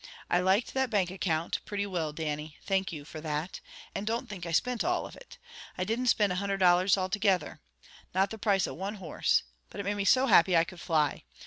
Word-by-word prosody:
I 175 Hz, -, +4 dB
liked 190 Hz, +5 st, +2 dB
that 265 Hz, -1 st, +1 dB
bank 195 Hz, -5 st, +1 dB
account, 170 Hz, -4 st, -1 dB
pretty 205 Hz, -1 st, -3 dB
will, 170 Hz, -6 st, -2 dB
Dannie. 150 Hz, -1 st, -4 dB
Thank 190 Hz, -1 st, 0 dB
you, 150 Hz, -3 st, -7 dB
for 155 Hz, 0 st, -9 dB
that. 155 Hz, +3 st, -4 dB, 0.3 s
And 205 Hz, -, -4 dB
don't 235 Hz, +3 st, -1 dB
think 185 Hz, -5 st, -7 dB
I -, -, -4 dB
spint 245 Hz, +8 st, +1 dB
all 355 Hz, +1 st, 0 dB
of -, -, -10 dB
it. -, -, -14 dB, 0.4 s
I 185 Hz, -, 0 dB
didn't 230 Hz, +6 st, -1 dB
spind 205 Hz, -4 st, +3 dB
a 180 Hz, -, -1 dB
hundred 200 Hz, 0 st, -1 dB
dollars 185 Hz, +1 st, +4 dB
all 185 Hz, -1 st, 0 dB
togither. 190 Hz, -4 st, 0 dB, 0.5 s
Not 190 Hz, +1 st, +1 dB
the 220 Hz, -, -7 dB
price 195 Hz, -3 st, +2 dB
of -, -, -6 dB
one 195 Hz, +4 st, -4 dB
horse! 180 Hz, -6 st, 0 dB, 0.3 s
But -, -, -9 dB
it -, -, -2 dB
made 200 Hz, +1 st, -1 dB
me 200 Hz, -, -1 dB
so 260 Hz, +6 st, +5 dB
happy 185 Hz, -6 st, +5 dB
I 165 Hz, -, +5 dB
could 180 Hz, +1 st, -10 dB
fly. 155 Hz, -4 st, +1 dB
190 Hz, 225 wpm, -29 LUFS, 170-205 Hz, 0.5 s, so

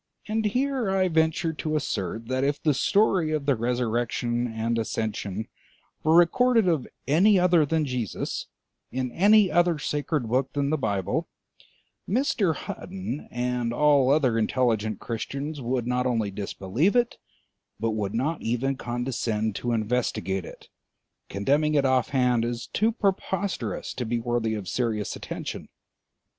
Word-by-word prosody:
And 220 Hz, 0 st, -1 dB
here 255 Hz, +1 st, 0 dB
I 190 Hz, -1 st, +2 dB
venture 160 Hz, 0 st, +1 dB
to 155 Hz, 0 st, -3 dB
assert 110 Hz, -, -2 dB
that 130 Hz, +1 st, 0 dB
if 145 Hz, +1 st, 0 dB
the 150 Hz, -, +2 dB
story 185 Hz, +1 st, +2 dB
of 150 Hz, -2 st, -1 dB
the 140 Hz, -2 st, +3 dB
resurrection 120 Hz, 0 st, -1 dB
and 115 Hz, 0 st, -1 dB
ascension 110 Hz, -2 st, -3 dB, 0.6 s
were 160 Hz, +1 st, +4 dB
recorded 225 Hz, +5 st, +4 dB
of 160 Hz, -7 st, +1 dB, 0.2 s
any 190 Hz, +8 st, +5 dB
other 175 Hz, -4 st, +4 dB
than 160 Hz, 0 st, +1 dB
Jesus 125 Hz, -6 st, -3 dB, 0.4 s
in 130 Hz, -1 st, -2 dB
any 205 Hz, -, +5 dB
other 175 Hz, -2 st, +3 dB
sacred 145 Hz, -2 st, -2 dB
book 130 Hz, +3 st, 0 dB
than 140 Hz, 0 st, 0 dB
the -, -, +3 dB
Bible, 100 Hz, -, -1 dB, 0.8 s
Mr. 205 Hz, -, +1 dB
Hutton 185 Hz, -, -6 dB
and 125 Hz, -1 st, -1 dB
all 140 Hz, 0 st, +4 dB
other 135 Hz, -6 st, +3 dB
intelligent 110 Hz, -3 st, 0 dB
Christians 140 Hz, +6 st, -4 dB
would 125 Hz, 0 st, -1 dB
not 125 Hz, +1 st, 0 dB
only 115 Hz, -5 st, 0 dB
disbelieve 105 Hz, -, -1 dB
it, 240 Hz, -1 st, +2 dB, 0.6 s
but 115 Hz, 0 st, 0 dB
would 105 Hz, -1 st, -2 dB
not 150 Hz, +7 st, -1 dB
even 125 Hz, +4 st, -1 dB
condescend 120 Hz, -3 st, -2 dB
to 120 Hz, -, -2 dB
investigate 110 Hz, -5 st, -1 dB
it, -, -, -12 dB, 0.6 s
condemning 145 Hz, +10 st, +1 dB
it 140 Hz, -2 st, +3 dB
offhand 125 Hz, -2 st, +2 dB
as 120 Hz, 0 st, -3 dB
too 220 Hz, +2 st, +1 dB
preposterous 195 Hz, -, -2 dB
to 125 Hz, -, -4 dB
be 120 Hz, +1 st, 0 dB
worthy 115 Hz, -2 st, -1 dB
of 100 Hz, -4 st, -6 dB
serious 110 Hz, 0 st, -1 dB
attention. -, -, -6 dB
130 Hz, 140 wpm, -26 LUFS, 115-160 Hz, 0.8 s, any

